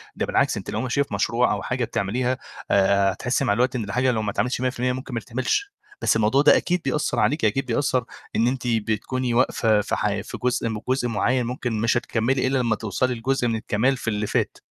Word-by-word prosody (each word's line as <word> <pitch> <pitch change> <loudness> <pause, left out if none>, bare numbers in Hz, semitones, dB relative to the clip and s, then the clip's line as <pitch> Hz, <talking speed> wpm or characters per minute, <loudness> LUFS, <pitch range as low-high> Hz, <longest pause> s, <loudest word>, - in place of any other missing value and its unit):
ده - - -1
بالعكس - - +1
أنتِ - - -6
لو 110 - -2
ماشية 130 +2 0
في 135 - -3
مشروع 115 +4 +1
أو - - -3
حاجة 125 -1 -1
بتعمليها، 120 +5 -1 0.3
آآ 100 0 +4
هتحسي 125 +6 -1
مع 100 - +2
الوقت 125 +3 +1
إن 115 - -1
الحاجة 125 +5 +1
لو 110 -2 -1
ما 105 -1 -2
اتعملتش 125 +3 -1
100% 125 0 0
ممكن 130 0 -7
ما 115 - -1
تتعملش، 130 - -2 0.3
بس - - +3
الموضوع 115 +5 +3
ده 150 - +6
أكيد 180 -1 0
بيأثّر 135 -3 0
عليكِ، 110 +5 +2
أكيد 135 +7 +1
بيأثّر 125 0 0 0.3
إن 115 - +3
أنتِ 125 -1 -2
بتكوني 115 +3 -1
واقفة 115 -3 +3
في - - -2
حي - - -1
في - - -7
جزء، 125 -2 0 0.2
جزء 130 -1 +1
مُعيّن 120 +3 +1
ممكن 120 0 -3
مش 115 +1 +2
هتكمّلي 125 +3 0
إلا 135 - +1
لمّا 115 -3 +1
توصلي 115 +4 -1
لجزء 125 +1 0
من 115 - 0
الكمال 115 +5 0
في - - -9
اللي 105 -1 -2
فات. - - -1
120 Hz, 215 wpm, -23 LUFS, 110-130 Hz, 0.3 s, ده